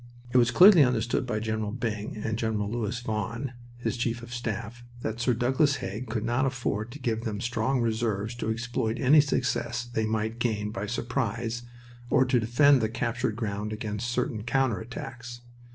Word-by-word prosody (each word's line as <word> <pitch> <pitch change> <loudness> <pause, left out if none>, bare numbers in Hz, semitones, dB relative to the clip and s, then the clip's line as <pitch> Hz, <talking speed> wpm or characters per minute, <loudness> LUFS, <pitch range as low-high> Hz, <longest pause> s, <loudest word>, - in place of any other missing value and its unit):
It 125 - +4
was 120 -1 +5
clearly 180 - +8
understood 120 -1 0
by 110 - -1
General 110 -1 -2
Byng 110 -3 -3
and 110 +1 -2
Gen. 110 -1 -1
Louis 110 +2 -2
Vaughan, 115 +3 -3 0.3
his 125 - -2
chief 120 0 -1
of 120 +1 -8
staff, 120 0 -4 0.2
that 110 0 -3
Sir 120 0 +2
Douglas 135 +5 +2
Haig 110 +3 -5
could 110 -1 -2
not 120 +4 +1
afford 120 -4 -1
to 145 - -9
give 115 -3 -1
them 105 -3 -3
strong 120 +2 0
reserves 110 -2 -1
to 110 - -2
exploit 115 0 -1
any 145 +3 +7
success 120 -4 -1
they 110 -2 -1
might 110 +1 -1
gain 105 -3 -1
by 105 0 -4
surprise 115 0 -2 0.5
or 130 - +4
to 125 -1 +3
defend 125 +4 +5
the 110 - +1
captured 115 0 -1
ground 105 -2 -3
against 110 +2 -3
certain 120 -3 -1
counter 120 -2 +1
attacks. 120 +1 -8
115 Hz, 175 wpm, -28 LUFS, 110-125 Hz, 0.5 s, clearly